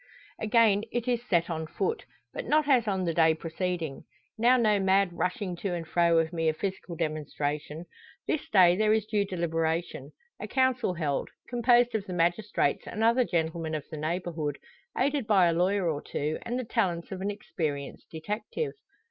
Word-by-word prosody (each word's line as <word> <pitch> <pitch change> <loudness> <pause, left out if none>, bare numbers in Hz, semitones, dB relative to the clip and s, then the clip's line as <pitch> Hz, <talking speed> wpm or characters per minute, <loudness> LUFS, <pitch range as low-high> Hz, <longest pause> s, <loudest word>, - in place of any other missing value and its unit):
Again 220 -2 +4
it 240 0 -2
is 240 -2 +1
set 170 -2 +3
on 160 -2 -3
foot, 450 - -2 0.3
but - - -5
not 305 -1 +3
as 250 -5 +4
on 190 -2 0
the 165 - 0
day 160 -1 +4
preceding. 165 -2 -4 0.3
Now 240 +3 +4
no 215 -4 +3
mad 195 -1 +3
rushing 180 +1 -2
to 180 0 -2
and 165 -2 -5
fro 170 0 +3
of 165 +1 +1
mere 165 -2 +1
physical 190 -1 -4
demonstration. 150 0 -3 0.4
This 310 - -2
day 180 -3 +6
there 215 +2 +3
is 220 -1 +1
due 210 -2 0
deliberation; 165 -4 -2 0.3
a 210 - -5
council 255 -5 +1
held, 150 -5 -1 0.2
composed 245 0 +3
of 210 -2 -2
the 185 - -4
magistrates 175 -2 0
and 220 - -3
other 235 +3 +4
gentlemen 160 -4 -1
of 150 - -4
the 155 - -5
neighbourhood, 155 -2 -2 0.4
aided 275 -2 +1
by 195 -4 +5
a 170 - +3
lawyer 185 +2 +1
or 150 -3 -1
two, 150 +2 -3
and 240 +1 -3
the 255 - -2
talents 185 -8 -1
of 190 -1 -5
an 200 - -1
experienced 150 -8 -4
detective. 210 - -4
180 Hz, 175 wpm, -28 LUFS, 160-220 Hz, 0.4 s, day